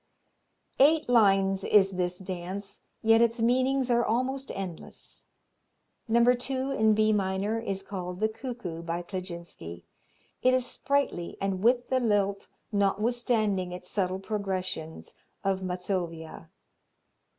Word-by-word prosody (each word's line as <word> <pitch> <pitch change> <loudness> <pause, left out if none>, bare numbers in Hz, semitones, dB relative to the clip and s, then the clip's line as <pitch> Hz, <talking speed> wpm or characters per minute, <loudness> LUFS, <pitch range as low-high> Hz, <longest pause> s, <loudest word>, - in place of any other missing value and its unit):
Eight 305 +3 +5
lines 195 -5 +4
is 195 -2 +5
this 180 -1 -1
dance, 190 +1 -5 0.2
yet 225 +1 +5
its 235 0 +2
meanings 255 +2 +2
are 240 0 +4
almost 260 +4 -1
endless. 185 -4 -6 0.8
No. 235 +1 +4
2, 260 +2 -2
in 220 -5 +3
B 215 0 +3
minor, 200 +2 0
is 195 -4 -3
called 180 -2 -5
The 215 - +3
Cuckoo 220 -7 -6
by 170 +1 -3
Kleczynski. 170 - -7 0.6
It 255 0 +4
is 255 -1 +2
sprightly 275 -10 -1
and 195 -1 -1
with 245 +1 +3
the 260 - +2
lilt, 200 -4 +1 0.2
notwithstanding 210 -2 +1
its 180 0 -7
subtle 185 -2 0
progressions, 185 -5 -4 0.3
of 195 -1 0
Mazovia. 180 -3 -4
200 Hz, 120 wpm, -28 LUFS, 185-235 Hz, 0.8 s, Eight